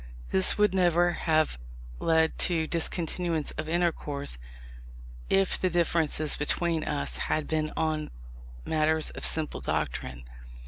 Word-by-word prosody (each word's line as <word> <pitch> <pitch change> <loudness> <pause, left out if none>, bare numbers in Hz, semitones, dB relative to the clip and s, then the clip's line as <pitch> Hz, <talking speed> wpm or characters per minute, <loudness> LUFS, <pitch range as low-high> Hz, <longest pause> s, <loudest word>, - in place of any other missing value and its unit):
This 95 - +4
would 210 -2 +3
never 175 -1 +3
have 155 - +1 0.4
led 160 -1 +2
to 165 -3 +3
discontinuance 165 -1 -2
of 155 0 -5
intercourse, 150 - -1 0.9
if 195 -1 +3
the 185 - +1
differences 165 -3 +1
between 165 +2 0
us 65 -4 -2
had 155 - 0
been 155 -1 -1
on 155 -1 -1 0.6
matters 155 0 +2
of - - -8
simple 155 -2 -1
doctrine. 60 0 -3
160 Hz, 120 wpm, -28 LUFS, 155-170 Hz, 0.9 s, This